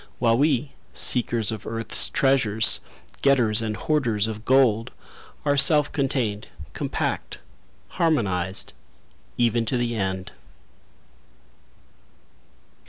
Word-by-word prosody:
While 115 -1 +2
we, 140 -2 +1 0.2
seekers 115 -4 +2
of 110 -3 -7
earth's 115 0 0
treasures 115 -6 +3 0.4
Getters 120 -6 +3
and 110 -1 -3
hoarders 115 -9 0
of 110 0 -7
gold, 125 -4 +3 0.6
Are 145 -1 +2
self 150 +1 +4
contained, 125 -7 -2 0.3
compact, - - -3 0.5
harmonized, 95 - 0 0.6
Even 120 -1 +1
to 125 - 0
the 120 -1 -2
end. 95 -2 -3
115 Hz, 95 wpm, -23 LUFS, 110-135 Hz, 0.6 s, self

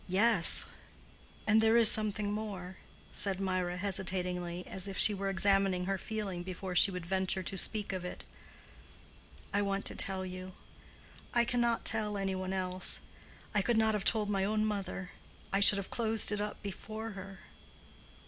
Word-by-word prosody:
"Yes—and 215 +2 +2
there 220 +1 +4
is 230 -2 +6
something 210 -1 +1
more," 195 -4 -6 0.3
said 195 -2 0
Mirah, 185 -2 -2
hesitatingly, 180 -2 -2
as 190 +1 -2
if 195 - -6
she 210 - +5
were 195 0 -3
examining 195 -1 +1
her 195 0 -2
feeling 205 -5 -5
before 185 +1 -7
she 190 - +8
would 180 -3 -6
venture 190 +1 -2
to 190 - -5
speak 205 +1 -4
of 185 -1 -5
it. 180 - -8 1.3
"I 205 - +1
want 200 0 -2
to - - -1
tell 190 -1 0
you; 185 0 -8 0.8
I 235 0 +3
cannot 235 -1 -1
tell 210 -1 +2
any 195 -1 -2
one 185 0 -4
else. 185 -1 0 0.5
I 210 - +2
could 235 +3 0
not 220 0 +2
have 210 -2 -2
told 215 -1 +2
my 195 -2 -1
own 215 +2 0
mother: 195 -3 -5 0.4
I 195 - +2
should 200 0 +8
have 200 - -6
closed 225 -3 +1
it 205 0 -2
up 210 +1 -6
before 215 +3 -7
her. 195 -1 -10
195 Hz, 165 wpm, -31 LUFS, 185-210 Hz, 1.3 s, she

